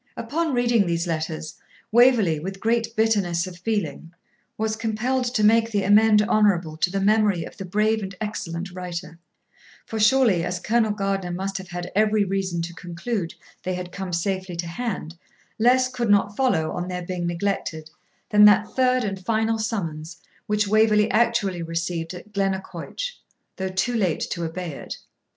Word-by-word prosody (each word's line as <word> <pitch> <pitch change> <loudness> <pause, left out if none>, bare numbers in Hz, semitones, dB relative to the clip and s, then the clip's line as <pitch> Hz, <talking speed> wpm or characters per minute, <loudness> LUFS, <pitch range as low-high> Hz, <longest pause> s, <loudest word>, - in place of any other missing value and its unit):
Upon 325 +1 -1
reading 235 -5 +3
these 170 0 0
letters 160 -1 -3 0.4
Waverley, 225 -9 +5
with 190 +4 -6
great 230 +1 0
bitterness 200 -6 +1
of 180 -1 -9
feeling, 180 -5 -3 0.5
was 220 0 -1
compelled 230 +4 -1
to 215 - +2
make 225 +2 +4
the 205 -3 0
amende 210 +1 +5
honorable 195 -7 +2
to 170 - +1
the 195 +2 -2
memory 205 -3 +3
of - - -11
the 195 - -6
brave 215 +4 +1
and 195 -1 -6
excellent 180 -4 -4
writer; 180 -2 -6 0.7
for 220 - -4
surely, 215 -5 +4
as 180 0 -2
Colonel 220 +3 +1
Gardiner 195 -3 -1
must 195 +2 -3
have 190 - -9
had 175 0 -6
every 215 0 +3
reason 190 -3 -1
to 175 +1 -6
conclude 175 +3 -4 0.3
they 185 0 -2
had 180 0 -6
come 190 -2 -5
safely 185 +1 -2
to 170 0 -4
hand, 180 -3 -4 0.4
less 255 +3 +4
could 245 -3 -3
not 205 0 +3
follow, 185 -12 +1
on 180 - -3
their 180 -1 -4
being 175 -1 -3
neglected, 170 -3 -3 0.4
than 210 0 +7
that 210 +1 +5
third 255 -1 +3
and 195 -3 -4
final 225 +1 +1
summons, 170 -8 -4 0.3
which 210 0 +1
Waverley 215 0 +4
actually 215 -6 +1
received 165 +1 -3
at 210 +4 -12
Glennaquoich, 195 - -3 0.4
though 190 0 -2
too 190 +6 -1
late 190 -8 0
to 170 - -3
obey 170 +1 -4
it. 140 - -7
195 Hz, 165 wpm, -24 LUFS, 175-220 Hz, 0.7 s, than